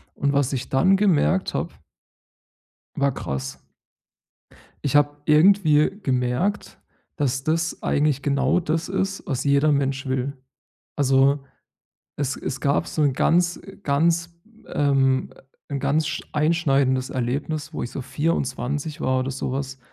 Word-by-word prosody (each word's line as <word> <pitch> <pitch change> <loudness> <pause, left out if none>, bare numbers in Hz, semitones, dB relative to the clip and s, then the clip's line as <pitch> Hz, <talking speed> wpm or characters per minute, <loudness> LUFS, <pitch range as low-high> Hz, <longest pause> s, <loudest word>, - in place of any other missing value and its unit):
Und 140 0 0
was 140 -1 +1
ich 130 -1 -4
dann 185 +9 +4
gemerkt 190 -1 +2
habe - - -3 1.2
war 140 0 +1
krass. 65 0 -5 1.3
Ich 140 0 0
habe 145 0 +3
irgendwie 155 -1 +5
gemerkt, 130 +9 -1 0.4
dass 135 -2 -1
das 165 +1 -1
eigentlich 145 -2 +1
genau 140 +4 +2
das 165 0 -2
ist, 195 0 -2
was 130 -3 -2
jeder 140 +2 +3
Mensch 135 -1 0
will. 130 +1 -2 0.6
Also, 135 0 +3 0.7
es 140 -1 -2
es 135 - -5
gab 140 0 +1
so 155 - -2
'n 140 -3 +2
ganz 175 +5 +2
äh, 195 - -13
ganz 170 +4 +1 0.3
ähm, 135 -2 +1 0.4
'n 140 -1 -2
ganz 150 +3 +1
sch - - -3
einschneidendes 140 -5 +1
Erlebnis, 145 +5 -3
wo - - -4
ich 120 - -6
so 135 - -5
24 145 +1 -2
war 130 0 +1
oder 130 +1 -3
so 130 0 -4
was 135 -1 -4
140 Hz, 135 wpm, -23 LUFS, 135-155 Hz, 1.3 s, irgendwie